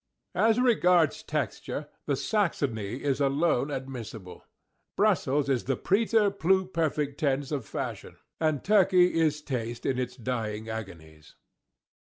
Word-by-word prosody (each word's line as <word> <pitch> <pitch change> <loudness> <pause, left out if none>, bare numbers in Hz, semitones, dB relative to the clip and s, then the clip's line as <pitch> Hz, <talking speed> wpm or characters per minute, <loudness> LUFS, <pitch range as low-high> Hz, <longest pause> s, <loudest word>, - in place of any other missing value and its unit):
As 225 +2 +3
regards 180 - +3
texture, 150 0 -3 0.2
the 145 - +1
Saxony 130 - -1
is 140 -1 0
alone 140 0 +2
admissible. 125 -8 -7 0.5
Brussels 140 +2 +2
is 130 -4 0
the 135 -1 0
preterpluperfect 190 -8 +1
tense 140 -1 0
of 135 -8 -3
fashion, - - -5 0.2
and 155 -3 0
Turkey 185 -3 +4
is 155 -2 +1
taste 120 -4 -4
in 130 -1 0
its 125 0 -3
dying 110 -3 -4
agonies. 80 -8 -9
140 Hz, 115 wpm, -28 LUFS, 125-170 Hz, 0.5 s, Turkey